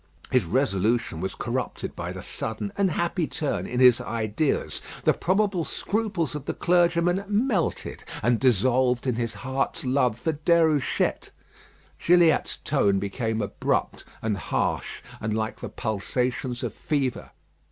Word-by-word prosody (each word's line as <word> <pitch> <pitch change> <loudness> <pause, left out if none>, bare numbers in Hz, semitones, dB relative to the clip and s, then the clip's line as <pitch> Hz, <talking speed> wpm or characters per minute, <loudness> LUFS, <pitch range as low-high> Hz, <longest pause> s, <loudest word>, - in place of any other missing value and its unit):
His 125 -7 +3
resolution 110 - 0
was 95 0 -3
corrupted 125 +1 -3
by - - -4
the - - -7
sudden 195 - -4
and 200 -2 +2
happy 170 0 0
turn 150 -4 -2
in 125 - -2
his 125 -2 +7
ideas. 115 +6 -1 0.2
The - - +4
probable 190 -1 +1
scruples 195 -4 -2
of 150 -2 -5
the - - -3
clergyman 175 +1 +2
melted, 210 - 0 0.2
and 120 0 +3
dissolved 125 +1 +3
in 130 - +1
his 115 -1 -2
heart's 130 +6 -2
love 125 -3 +2
for 160 +6 -1
Déruchette. 155 -2 +2 0.7
Gilliatt's 170 -2 +4
tone 105 -9 +2
became 110 +2 -2
abrupt 100 - -1 0.2
and 110 -2 0
harsh, - - -2 0.2
and 110 0 -2
like 110 0 -2
the - - -6
pulsations 125 +4 -2
of 120 - -3
fever. 140 -4 -2
130 Hz, 135 wpm, -26 LUFS, 115-170 Hz, 0.7 s, his